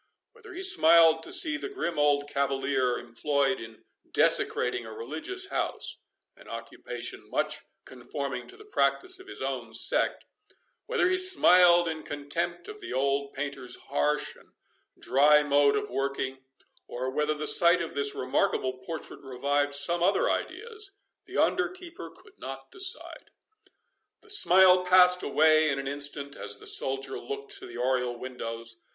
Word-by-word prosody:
Whether 455 -4 -14
he 375 +2 -5
smiled 165 - +5
to - - -10
see 315 -2 +3
the 400 - -6
grim 175 - -4
old 145 -1 +2
cavalier 135 -2 -1
employed 135 +3 -1
in 110 0 -12 0.3
desecrating 125 -1 +1
a 110 - -10
religious 160 - -5
house—(an - - -6
occupation - - -7
much - - -2 0.3
conforming - - -6
to 390 - -11
the 425 - -15
practice 370 -2 0
of 375 - -14
his - - -8
own - - -5
sect)—whether 425 +1 -2
he 370 0 +1
smiled 180 - +5
in 160 -1 -4
contempt 150 +5 -4
of 425 -1 -10
the 365 - -8
old 140 +1 -1
painter's 135 -3 -4 0.2
harsh 150 +1 0
and - - -22 0.4
dry 150 +3 +4
mode 145 -1 +3
of - - -3
working—or 130 -1 -5
whether 150 +2 -1
the 150 0 -5
sight 170 +3 +5
of 170 -1 -5
this 140 0 +1
remarkable 130 0 -1
portrait 160 +5 -8
revived 140 +2 -1
some 170 +4 +2
other 190 +3 +2
ideas, 430 -3 -5 0.3
the - - -7
under 360 -1 +2
keeper 360 -2 -10
could - - -20
not - - -9
decide. 380 -2 -2 0.9
The 430 - -9
smile 185 - +6
passed 180 0 +5
away 155 +1 +3
in 140 - -1
an 135 0 -5
instant, 145 0 -1
as - - -5
the - - -15
soldier 135 0 +2
looked 425 0 -7
to 380 - -10
the - - -10
oriel 125 -1 -1
windows. 115 -2 -6
150 Hz, 145 wpm, -27 LUFS, -, 0.9 s, smile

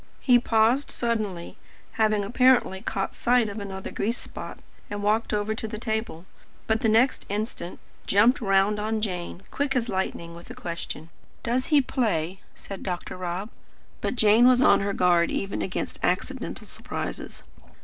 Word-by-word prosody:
He 245 -2 +5
paused 230 +4 +2
suddenly, 215 -7 -2 0.3
having 215 -2 +2
apparently 245 -3 +3
caught 195 0 -2
sight 245 -2 +2
of 205 +2 -6
another 190 -1 -6
grease 230 +4 -1
spot, - - -8 0.3
and 205 0 -4
walked 215 +2 +1
over 210 +1 0
to 220 0 -4
the 215 0 -5
table; 220 -6 -3 0.4
but 220 0 +1
the 225 - +3
next 230 +5 +3
instant 205 -3 -4 0.3
jumped 225 +7 +4
round 195 0 +3
on 220 +1 -1
Jane, 180 -3 -4
quick 280 -1 -1
as 240 -2 0
lightning, 170 -3 -3
with 170 +1 -12
a - - -8
question. 170 -1 -6 0.3
"Does 250 +2 0
he 295 -3 +5
play?" 190 - -1 0.2
said 195 -1 -8
Dr. 180 -2 -4
Rob. 185 +4 -4 0.5
But - - -1
Jane 220 +1 +6
was 255 -1 +6
on - - +6
her 200 0 -1
guard, 175 -2 +3
even 195 - -2
against 185 - -3
accidental - - -2
surprises. - - -6
210 Hz, 160 wpm, -26 LUFS, 190-235 Hz, 0.5 s, Jane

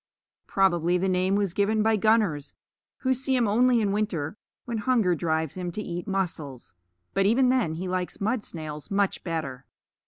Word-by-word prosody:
Probably 180 -2 +2
the 190 +2 0
name 185 +1 +2
was 200 -4 0
given 210 +2 +2
by 220 0 +3
gunners, 210 -9 +1 0.5
who 260 -1 +2
see 265 +1 0
him 240 -3 +2
only 240 +3 +4
in 205 -2 +1
winter 200 -6 -1 0.3
when 235 -2 -3
hunger 215 -5 +2
drives 160 -2 -1
him 180 -1 -4
to 210 - -3
eat 175 -2 -5
mussels 165 - -3 0.4
but 195 0 +3
even 250 +4 +4
then 240 -12 +1
he 180 +3 -4
likes 180 0 -3
mud 220 +2 0
snails 155 -3 -6
much 200 -1 0
better. 155 -7 -4
195 Hz, 175 wpm, -26 LUFS, 170-220 Hz, 0.5 s, only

